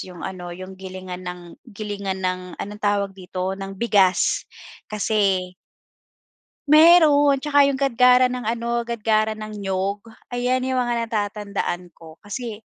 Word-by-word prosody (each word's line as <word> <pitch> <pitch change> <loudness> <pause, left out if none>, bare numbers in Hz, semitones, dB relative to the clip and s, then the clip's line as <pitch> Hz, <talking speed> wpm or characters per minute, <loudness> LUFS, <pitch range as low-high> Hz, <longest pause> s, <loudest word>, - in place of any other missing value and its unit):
'yong 180 -2 -9
ano, 180 -2 -6
'yong 185 +2 -9
gilingan 185 -1 -7
ng 180 0 -6 0.3
gilingan 200 -3 -5
ng 185 0 0 0.2
anong 210 +1 -7
tawag 200 -1 0
dito, 185 0 -4
ng 195 0 -7
bigas, 195 -4 +2 0.4
kasi 200 -4 0 1.2
Meron, 305 -3 +7
tsaka 285 -1 +4
'yung 275 - 0
gadgaran 250 -1 +4
ng 250 -3 -5
ano, 235 +1 -1
gadgaran 215 -1 +1
ng 215 0 -7
niyog. 195 +1 -2 0.3
Ayan, 250 +1 0
'yung 260 -1 0
mga 240 -1 0
natatandaan 205 -5 -3
ko, 160 0 -14
kasi 220 +1 -5
205 Hz, 130 wpm, -22 LUFS, 190-240 Hz, 1.2 s, Meron